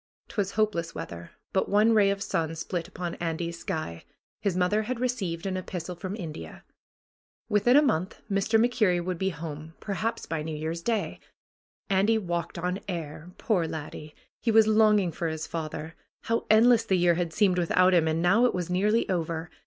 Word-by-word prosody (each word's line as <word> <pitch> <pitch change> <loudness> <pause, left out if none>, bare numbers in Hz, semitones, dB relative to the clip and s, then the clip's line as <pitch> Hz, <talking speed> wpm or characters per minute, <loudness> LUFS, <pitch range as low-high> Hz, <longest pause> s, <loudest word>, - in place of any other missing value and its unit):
'Twas 200 -2 -2
hopeless 195 -6 0
weather, 85 0 -7 0.2
but 190 - +1
one 210 +3 +4
ray 205 -2 +5
of 200 0 -1
sun 165 0 -1
split 170 +1 -4
upon 180 -2 -5
Andy's 170 0 -3
sky. 155 - -4 0.4
His 195 -3 0
mother 185 +4 +2
had 235 +2 -3
received 200 -10 -2
an 190 -1 -1
epistle 180 -1 -5
from 185 +3 -5
India. 155 - -8 0.9
Within 230 +5 +4
a 295 - +6
month 185 - 0
Mr. 200 +2 +2
MacKerrie 210 -7 +2
would 180 -2 -3
be 190 - +1
home, 160 -1 -7
per 205 - -4
haps 225 +4 -2
by 165 -2 -3
New 155 0 -4
Year's 160 +2 -3
Day. 225 +1 -1 0.7
Andy 200 +3 +3
walked 175 -4 -3
on 180 +3 -2
air. 165 -2 -5
Poor 185 -8 +1
laddie! 155 -1 -7 0.3
He 230 - 0
was 220 -1 +6
longing 215 -4 +4
for 165 +1 -3
his 160 0 -3
father. 160 0 -5 0.3
How 230 0 -1
endless 230 +2 +6
the 190 - +1
year 175 -1 +4
had 170 -1 -1
seemed 185 0 +2
without 185 +2 +3
him! 165 -2 +4
And 160 +1 0
now 215 +7 +5
it 245 - +1
was 180 -1 -3
nearly 210 +5 +2
over. 165 -2 -2
180 Hz, 185 wpm, -27 LUFS, 165-210 Hz, 0.9 s, a